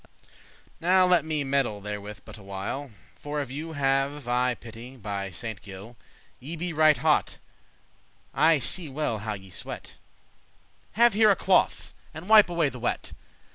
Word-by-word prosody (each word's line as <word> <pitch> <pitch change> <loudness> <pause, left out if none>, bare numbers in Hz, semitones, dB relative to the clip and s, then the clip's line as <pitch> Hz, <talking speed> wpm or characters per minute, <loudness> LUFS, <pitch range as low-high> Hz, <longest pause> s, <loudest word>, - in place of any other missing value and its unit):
"Now 185 +2 +4
let 180 -4 +4
me 155 -2 -1
meddle 135 -6 0
therewith 105 0 -7
but - - -11
a - - -13
while, 100 +8 -5 0.3
For 145 0 -5
of 140 -3 -4
you 160 +4 -6
have 135 -1 0
I 125 0 +1
pity, 120 +3 -11
by 100 -3 -4
Saint 100 +4 -6
Gile. 100 +4 -11 0.4
Ye 150 +7 -5
be 170 +1 -3
right 155 -1 +5
hot, - - +1 1.0
I 160 +1 +4
see 160 +4 -1
well 135 -6 -2
how 105 0 -3
ye 95 -1 -13
sweat; - - -7 1.0
Have 235 +1 +5
here 215 +1 +5
a 200 - +5
cloth, 185 -1 +1 0.2
and 160 +4 -8
wipe 215 -3 +7
away 170 -4 +1
the 125 - -10
wet." 120 - -3
135 Hz, 160 wpm, -26 LUFS, 110-160 Hz, 1.0 s, wipe